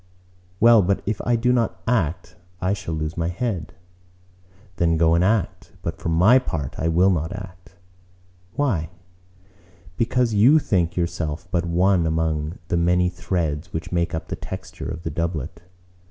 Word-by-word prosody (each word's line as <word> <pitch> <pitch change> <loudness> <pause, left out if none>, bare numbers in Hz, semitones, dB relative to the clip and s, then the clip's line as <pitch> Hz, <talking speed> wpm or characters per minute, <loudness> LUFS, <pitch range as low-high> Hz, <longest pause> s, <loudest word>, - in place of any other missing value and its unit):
"Well, 115 -1 +7
but 95 +1 0
if 105 0 -2
I 120 - +3
do 125 +2 +2
not 115 -6 0
act, 90 -8 -1 0.2
I 95 +1 0
shall 95 -5 -4
lose 80 +1 -3
my 85 0 -1
head." 90 -4 -3 1.0
"Then 85 -1 +2
go 80 0 +4
and 85 +1 +3
act! 95 -2 -1
But 85 0 -4
for - - -3
my 95 +11 +5
part 75 - -4
I 80 - 0
will 90 +4 +4
not 80 -1 -1
act." 90 -3 -10 0.8
"Why?" 95 - 0 1.1
"Because 120 0 +1
you 120 +9 +6
think 90 - 0
yourself 85 -1 -2
but 85 0 0
one 90 0 +2
among 80 0 -1
the 85 - +1
many 90 +1 +2
threads 85 -4 -3
which 80 - -5
make 85 -2 0
up 80 - -6
the - - -2
texture - - -7
of 85 - -6
the 80 - -3
doublet. 85 0 -3
90 Hz, 160 wpm, -23 LUFS, 80-100 Hz, 1.1 s, Well